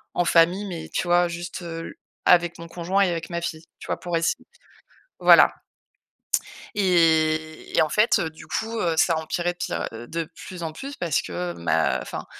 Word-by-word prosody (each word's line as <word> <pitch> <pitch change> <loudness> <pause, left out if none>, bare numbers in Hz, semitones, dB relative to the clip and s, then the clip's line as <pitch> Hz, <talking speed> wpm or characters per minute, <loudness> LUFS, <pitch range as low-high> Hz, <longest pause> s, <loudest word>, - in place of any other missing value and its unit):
en 175 - +2
famille», 175 +5 +4
mais 170 -5 -6
tu - - 0
vois, 175 0 +4
juste, 175 +1 -6
heu, 165 -1 -5
l - - -9 0.3
avec 175 -1 +4
mon 170 - -8
conjoint 175 +3 -1
et 185 - +1
avec 165 -1 -4
ma 170 -1 -3
fille. 160 -1 -4 0.2
Tu - - -10
vois, - - -2
pour 175 -1 -2
ess 165 0 +1 0.8
voilà. - - +7 1.2
Et 160 -4 +2
et - - +6
en 155 - +1
fait, 210 +6 +3
heu, 160 -3 -2
du 160 - -14
coup, 225 +1 -3
heu, 170 -2 +1
ça 165 +1 +3
empirait 175 +2 -1
de - - -39
pire - - -3
heu, 115 +1 -8
de 165 0 -2 0.2
plus 180 -2 -8
en 160 - -3
plus 275 - -8
parce 170 -5 0
que 90 0 -4
ma 85 -1 +1
enfin, - - -7
170 Hz, 200 wpm, -24 LUFS, 160-175 Hz, 1.2 s, voilà